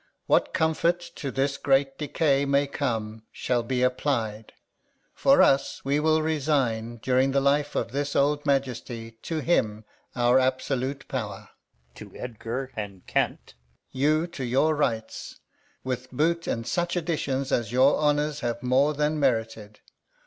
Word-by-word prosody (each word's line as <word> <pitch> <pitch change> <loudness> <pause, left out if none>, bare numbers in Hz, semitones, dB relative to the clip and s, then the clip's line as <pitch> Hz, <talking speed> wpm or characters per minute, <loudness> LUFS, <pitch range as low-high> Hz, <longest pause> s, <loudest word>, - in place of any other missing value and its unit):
What - - +2
comfort 165 +2 +1 0.2
to 140 - -4
this 135 +1 -1
great 135 0 +1
decay 145 -1 +1
may 140 0 +2
come 115 -6 -3
Shall 125 -1 -1
be 125 +2 -1
applied. 120 -4 -1 0.6
For - - +5
us, 135 0 +1
we 140 +2 +2
will 155 0 +2
resign, 135 -7 0
During 130 +1 +2
the 140 - +4
life 145 +1 +1
of - - -1
this 140 +2 -2
old 145 +1 +2
Majesty, 120 -5 -2
To 160 -2 -3
him 110 -11 0 0.3
our 120 +1 +4
absolute 130 +1 -1
power; 105 -7 -5 0.4
[to - - -11
Edgar 125 +2 -5
and 100 -4 -6
Kent] - - -1 0.4
you 155 +4 +2
to 170 -6 -7
your 135 +6 +2
rights; 115 -7 -3 0.4
With 130 0 -4
boot, 165 +6 0
and 115 0 -2
Such 175 +6 -1
addition 155 -6 -1
as 120 -5 -1
your 130 +3 +5
honours 150 0 +1
Have 120 -1 -3
more 135 +4 +3
than 150 +1 0
merited. 115 -5 -1
135 Hz, 140 wpm, -26 LUFS, 120-145 Hz, 0.6 s, For